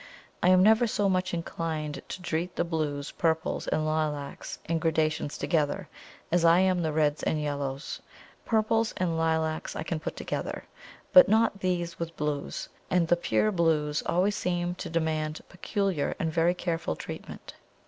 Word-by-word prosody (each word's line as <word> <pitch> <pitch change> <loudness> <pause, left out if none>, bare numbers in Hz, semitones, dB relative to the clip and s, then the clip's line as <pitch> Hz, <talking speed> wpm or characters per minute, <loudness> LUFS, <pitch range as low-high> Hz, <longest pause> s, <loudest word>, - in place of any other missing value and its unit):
I 180 - +4
am 185 0 +6
never 220 +3 +5
so 205 -2 +1
much 185 -1 +1
inclined 160 -3 -3
to 185 - -6
treat 175 +1 -2
the - - +1
blues, 150 -4 -2
purples, 160 -1 -1
and 155 - 0
lilacs 155 -2 -2
in 165 0 0
gradations 155 -2 0
together 160 +3 0 0.4
as 175 0 +3
I 165 0 +6
am 185 -2 +2
the 160 -2 0
reds 150 -1 +1
and 155 - 0
yellows. 140 -1 -3 0.4
Purples 225 0 +1
and 175 -3 0
lilacs 160 -1 0
I - - -3
can 165 -1 -3
put - - -5
together, - - -4 0.5
but 275 -7 +9
not 220 -1 +3
these 175 -2 -2
with 165 -1 -5
blues; 150 -1 -3 0.2
and 180 -2 +2
the 175 - +5
pure 215 +4 +1
blues 155 -5 +1
always 190 +4 +2
seem 175 -2 -1
to - - -6
demand 155 -1 -1
peculiar 190 -3 -1
and 160 -1 -2
very 170 +2 +3
careful 165 - -2
treatment. - - -8
165 Hz, 160 wpm, -28 LUFS, 155-180 Hz, 0.5 s, but